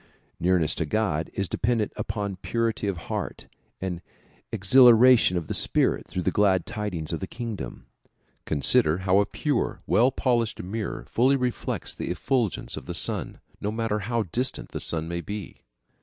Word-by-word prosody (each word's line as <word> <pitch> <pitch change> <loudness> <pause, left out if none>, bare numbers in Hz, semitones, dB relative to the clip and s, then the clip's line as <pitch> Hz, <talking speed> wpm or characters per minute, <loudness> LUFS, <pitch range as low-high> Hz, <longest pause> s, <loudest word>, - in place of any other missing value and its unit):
Nearness 85 -3 +2
to 80 - -2
God 80 -4 0
is 100 -1 -1
dependent 115 +1 0
upon 100 -3 -3
purity 115 +1 -1
of 100 - -1
the 85 - -9
heart - - -5 0.3
and 90 -2 -4 0.5
exhilaration 120 -1 +6
of 85 - -3
the - - -4
spirit - - +2
through 90 - -3
the - - +1
glad 95 -4 +2
tidings 105 -8 -4
of 85 - -2
the 95 - -5
kingdom. 115 -2 -6 0.6
Consider 75 +1 +3
how 95 +1 +4
a 100 - +2
pure, 140 +4 -2
well 125 +3 +4
polished 120 -4 0
mirror 100 - -4
fully 130 - +3
reflects 125 -2 -2
the - - -5
effulgence 110 +5 -1
of - - -9
the - - -4
sun, - - 0 0.2
no 105 - -2
matter 110 -1 -1
how 115 +3 -1
distant 120 +8 -3
the - - -5
sun 80 -1 -1
may 85 0 -3
be. 100 +3 -7
105 Hz, 165 wpm, -26 LUFS, 90-115 Hz, 0.6 s, exhilaration